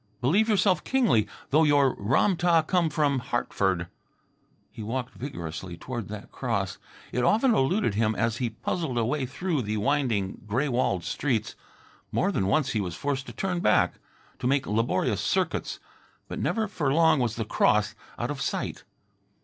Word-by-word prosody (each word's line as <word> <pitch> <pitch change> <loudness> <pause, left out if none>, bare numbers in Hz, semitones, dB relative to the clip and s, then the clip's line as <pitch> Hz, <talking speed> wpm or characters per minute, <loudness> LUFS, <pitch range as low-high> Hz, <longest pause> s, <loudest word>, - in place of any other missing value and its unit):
Believe 190 - +3
yourself 195 -5 +3
kingly, 220 - +2 0.2
though 155 +3 +5
your 145 -3 +4
Ram 135 - +2
tah 170 -2 +3
come 170 0 +1
from 145 -3 +1
Hartford." 95 -7 -1 0.9
He - - -9
walked 125 +3 -3
vigorously 85 - -6
toward 120 0 -5
that 105 -1 -8
cross. 100 -7 -2 0.3
It 125 - 0
often 230 - +4
eluded 175 - +2
him 110 +1 +1
as 115 +2 0
he 120 -2 -1
puzzled 130 +4 -3
a 115 - +2
way 130 +2 -1
through 160 +2 -1
the 110 -1 -2
winding 115 -6 0
gray 125 +8 0
walled 120 -8 0
streets. 120 - -1 0.6
More - - +1
than 95 - 0
once 135 +7 +2
he 110 - 0
was 90 -4 -4
forced 135 +2 -2
to - - -6
turn 185 -2 -2
back, 105 - +2 0.4
to - - -1
make 135 0 +2
laborious 115 +3 0
circuits. - - -1 0.5
But - - -5
never 205 +9 0
for 150 -8 -1
long 160 0 +4
was 120 -3 0
the 115 - -3
cross 105 -1 +2 0.2
out - - -2
of - - -5
sight. - - -3
130 Hz, 165 wpm, -27 LUFS, 110-155 Hz, 0.9 s, though